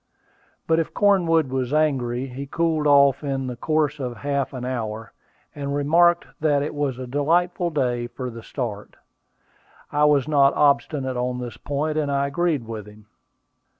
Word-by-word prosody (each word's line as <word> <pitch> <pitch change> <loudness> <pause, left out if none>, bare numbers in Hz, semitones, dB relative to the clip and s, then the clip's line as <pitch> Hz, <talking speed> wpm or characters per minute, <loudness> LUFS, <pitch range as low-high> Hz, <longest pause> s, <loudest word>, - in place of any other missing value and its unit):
But 160 0 +2
if 165 - -3
Cornwood 170 -7 +3
was 130 -1 -2
angry, 130 -5 0
he 135 +2 -7
cooled 160 0 0
off 140 -1 +5
in 135 -2 -2
the 125 -1 -4
course 150 +3 0
of 125 -3 -4
half 140 -1 -2
an 125 -2 -6
hour, 115 -3 -4 0.4
and 140 -1 -4
remarked 170 +4 +3
that 145 -2 +2
it 150 - -4
was 145 -4 -2
a 130 - -6
delightful 170 +7 +1
day 125 -6 -1
for 125 0 -6
the 115 0 -9
start. 110 -4 -6 1.0
I 150 +1 +3
was 145 -2 +3
not 140 -2 +4
obstinate 140 -2 +1
on 125 0 -1
this 120 -2 -6
point, 150 +3 -2
and 145 -2 -1
I 140 0 +1
agreed 145 -2 0
with 110 -2 -7
him. 105 0 -15
140 Hz, 165 wpm, -23 LUFS, 125-155 Hz, 1.0 s, off